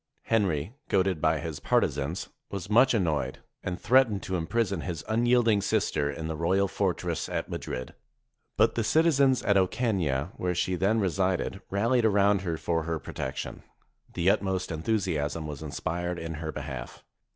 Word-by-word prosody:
Henry, 95 -5 0 0.2
goaded 95 -4 +1
by 80 -1 +3
his 80 -1 -5
partisans, 80 +7 0 0.2
was 100 0 -6
much 120 +3 +5
annoyed, 85 -8 0 0.2
and 90 0 -4
threatened 120 -5 +3
to 95 - -2
im 80 -2 -2
prison 100 -7 0
his 85 -4 -4
unyielding 115 -1 +3
sister 95 -9 0
in 80 +3 -4
the 80 - -3
royal 95 +5 +2
fortress 90 -3 -1
at - - -3
Mad - - -5
rid. 65 0 -5 0.6
But - - +4
the 115 - 0
citizens 140 -1 +3
at 100 -2 +3
Ocana, 95 - 0
where 90 -1 -1
she 85 +2 0
then 100 +5 +2
resided, 95 0 0
ralHed 115 +5 +2
around 100 -2 +4
her 85 -4 -2
for 80 0 0
her 80 0 -1
protection. - - -5 0.5
The 90 +3 +3
utmost 95 -3 -1
en 80 -1 -4
thusiasm 80 -7 -1
was 75 -2 -6
inspired 85 +3 -3
in 80 -1 -5
her 80 0 -4
behalf. - - -7
95 Hz, 160 wpm, -28 LUFS, 80-105 Hz, 0.6 s, much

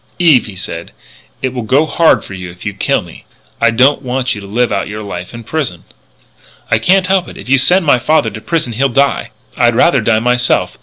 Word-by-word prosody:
"Eve," 160 -10 +4
he 100 - -9
said, 85 -2 -6 0.5
"it 130 -1 -1
will 125 - -3
go 135 +8 +2
hard 165 +1 +2
with - - -13
you 90 -2 -7
if 90 +3 -13
you 100 - -3
kill 100 - 0
me. - - -14 0.4
I 115 - +5
don't 130 +5 +3
want 130 -1 -1
you 105 - -7
to 100 - -10
live 120 +4 0
out 100 - -1
your 105 +1 -6
life 90 -3 -7
in 115 -1 -9
prison." 125 - -3 0.9
"I - - +3
can't 190 0 +3
help 190 -1 +1
it. - - -11
If - - -10
you 135 +1 +4
send 180 +7 +3
my 135 -5 +4
father 145 -2 +1
to 110 - -9
prison 155 -6 -1
he'll 135 +5 +1
die. 140 +3 +1 0.3
I'd - - +2
rather - - +3
die 115 -1 +2
myself. 125 +1 0
125 Hz, 225 wpm, -14 LUFS, 105-145 Hz, 0.9 s, I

